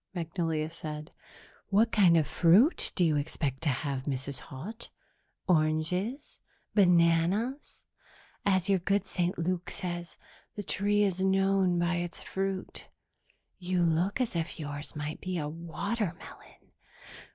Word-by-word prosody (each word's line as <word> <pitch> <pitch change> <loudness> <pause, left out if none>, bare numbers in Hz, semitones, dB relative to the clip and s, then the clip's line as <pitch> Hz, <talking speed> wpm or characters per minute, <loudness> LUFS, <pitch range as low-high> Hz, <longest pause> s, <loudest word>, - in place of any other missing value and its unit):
Magnolia 165 -2 -1
said. 155 -1 -7 0.6
"What 215 +3 +3
kind 180 -6 +5
of 155 - +3
fruit 180 - +4
do 180 - +2
you 155 -3 +3
expect 145 -2 -2
to 160 - +1
have, 135 0 -2
Mrs. 140 -1 -3
Haut? 185 - -9 0.6
Oranges? 180 - 0 0.3
Bananas? 180 - +2 0.6
As 190 -3 +2
your 195 -2 +3
good 195 +3 +1
St. 180 -1 -1
Luke 180 +1 -2
says, 175 -1 -5 0.4
the 205 - -4
tree 205 +2 +1
is 190 -2 0
known 190 -1 +3
by 175 0 +1
its 175 0 -5
fruit. 195 0 -4 0.7
You 180 -1 0
look 170 +6 +1
as 245 -7 -1
if 165 +1 -3
yours 145 0 -6
might 150 +1 -5
be 185 -1 -3
a 150 -3 -2
watermelon." 170 +4 -5
175 Hz, 130 wpm, -30 LUFS, 160-195 Hz, 0.7 s, kind